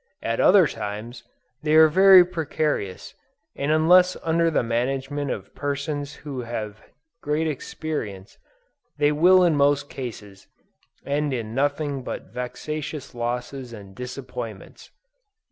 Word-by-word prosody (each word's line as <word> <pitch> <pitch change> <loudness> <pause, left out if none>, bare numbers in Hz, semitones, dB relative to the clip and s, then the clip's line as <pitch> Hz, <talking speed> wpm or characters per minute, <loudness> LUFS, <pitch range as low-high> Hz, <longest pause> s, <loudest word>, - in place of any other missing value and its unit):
At 115 0 -1
other 190 -2 +6
times, 105 0 -6 0.4
they 155 0 +1
are 160 0 +8
very 190 +2 +7
precarious, 150 - -3 0.4
and 140 +2 -1
unless 180 +4 +5
under 165 +1 +2
the 155 - +1
management 135 +4 -2
of 100 -3 -5
persons 145 +1 -4
who 135 -4 -4
have 110 -3 -6 0.4
great 150 +2 0
experience, 125 -9 -5 0.6
they 145 0 +3
will 180 +5 +5
in 170 -3 +3
most 145 0 +2
cases, 105 -6 -8 0.6
end 145 -1 -1
in 110 -2 -5
nothing 145 +1 -1
but 125 - -7
vexatious 150 +4 -5
losses 120 +1 -4
and 100 -3 -11
disappointments. 125 -4 -8
140 Hz, 120 wpm, -24 LUFS, 120-155 Hz, 0.6 s, are